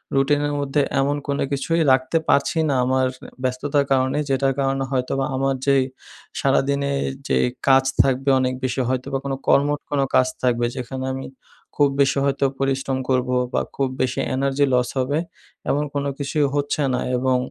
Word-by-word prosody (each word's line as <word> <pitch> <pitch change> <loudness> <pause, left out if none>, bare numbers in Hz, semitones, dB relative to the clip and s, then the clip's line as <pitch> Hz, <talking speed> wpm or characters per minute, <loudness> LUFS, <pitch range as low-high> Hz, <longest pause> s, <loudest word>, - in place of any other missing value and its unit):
রুটিনের 145 +1 +2
মধ্যে 140 +1 0 0.2
এমন 140 +2 +1
কোনো 140 0 0
কিছুই 165 +4 0
রাখতে 130 +5 +2
পারছি 140 - +2
না 140 - +1
আমার 130 0 +2 0.4
ব্যস্ততার 140 +3 0
কারণে। 130 +1 +2
যেটার 135 0 +1
কারণে 135 0 0
হয়তোবা 135 +1 0
আমার 135 0 0
যে, 140 - +4 0.6
সারাদিনে 140 0 +1 0.2
এ - - -1 0.2
যেই - - +2 0.2
কাজ 135 0 +6 0.2
থাকবে 135 +1 0
অনেক 130 0 0
বেশি 130 0 0
হয়তোবা 130 +1 -1
কোনো 135 -1 -1
কর্মঠ 145 +1 +3
কোনো 140 -2 +2
কাজ 130 - +5 0.2
থাকবে। 120 -1 +2
যেখানে 130 +1 -5
আমি 135 0 -5 0.5
খুব 145 -1 +4
বেশি 140 0 +2
হয়তো 140 0 +1
পরিশ্রম 135 -1 0
করবো 125 0 +1 0.2
বা - - +2
খুব 135 -1 +1
বেশি 130 0 0 0.2
এনার্জি 140 +1 +1
লস 125 -1 +2
হবে। 140 +4 0 0.5
এমন 145 +1 +1
কোনো 140 0 -1
কিছুই 145 +1 0
হচ্ছে 145 +1 0
না 125 - 0 0.2
এবং, 130 0 +2
135 Hz, 165 wpm, -22 LUFS, 130-140 Hz, 0.6 s, কাজ